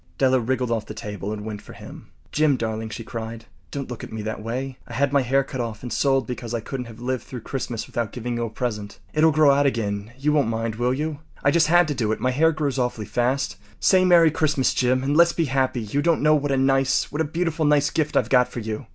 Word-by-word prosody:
Della 130 -1 +3
wriggled 125 0 -1
off 115 -2 -1
the 110 - -7
table 105 -2 -5
and 105 -1 -5
went 105 -2 -5
for - - -12
him. - - -12 0.2
“Jim, 150 -3 +3
darling,” 110 -1 -3
she 115 - -6
cried, 115 0 -6 0.2
“don’t 140 -1 -5
look 120 - -7
at - - -8
me 110 -1 -5
that 110 0 -4
way. 130 +4 -4
I - - -9
had 140 0 +1
my 140 - +4
hair 135 +2 +2
cut 130 -2 -5
off 115 -2 -5
and 125 - -4
sold 135 -3 +2
because 120 0 -5
I - - -1
couldn’t 125 +2 -5
have 115 0 -12
lived 125 +1 -2
through 125 -3 -8
Christmas 120 -2 -4
without 115 -3 -3
giving 120 0 -4
you 120 0 -1
a - - -4
present. 105 -3 -4 0.2
It’ll 155 +1 +5
grow 155 -1 +5
out 140 +1 +3
again—you 115 +4 -2
won’t 145 -6 +2
mind, 115 0 -2
will 120 +1 +1
you? 150 +1 -3 0.2
I 140 - +4
just 160 0 +4
had 175 +1 +5
to - - 0
do 115 -5 -1
it. 110 - -1
My 130 - +1
hair 160 +5 +3
grows 145 -4 -2
awfully 125 -3 -1
fast. 120 -6 -1 0.2
Say 185 -1 +4
‘Merry 170 -3 +6
Christmas!’ 150 -4 +1
Jim, 130 +1 +1
and 140 +2 0
let’s 170 +1 +5
be 165 - 0
happy. 130 -2 0
You 110 +7 -1
don’t 165 -1 +2
know 155 0 +5
what 145 -1 +1
a 135 - +2
nice—what 135 +3 +2
a 160 0 -4
beautiful, 165 -2 0
nice 145 -1 +3
gift 155 -2 0
I’ve - - +2
got 125 -2 +4
for 125 - -7
you. 110 +2 -5
130 Hz, 255 wpm, -23 LUFS, 115-145 Hz, 0.2 s, Merry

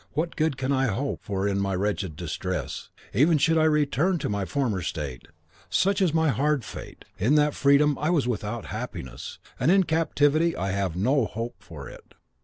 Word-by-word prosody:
what 165 +4 -2
good 155 -3 0
can 135 +1 -1
I 135 -1 +2
hope 135 +4 -2
for 100 -2 -1
in 100 -1 0
my 100 -1 0
wretched 95 -3 -2
distress, 85 0 -4 0.2
even 150 - +4
should 160 +3 +3
I 155 - +4
return 150 +3 +2
to 145 - -3
my 100 -1 -1
former 115 -6 -1
state? 75 -7 -5 0.4
Such 195 +1 +2
is 180 -4 +3
my 160 0 +2
hard 140 +1 +1
fate, - - -9
that - - -4 0.2
in 150 0 +3
freedom 140 +1 +4
I 150 - 0
was 155 -8 +2
without 115 -1 -3
happiness, 65 0 -6 0.2
and 125 - +2
in 190 +1 +5
captivity 160 0 +2
I 95 0 -2
have 95 -3 -1
no 125 +7 +2
hope 115 -3 -6
of 75 -4 -8
it." - - -14
135 Hz, 190 wpm, -26 LUFS, 100-155 Hz, 0.4 s, in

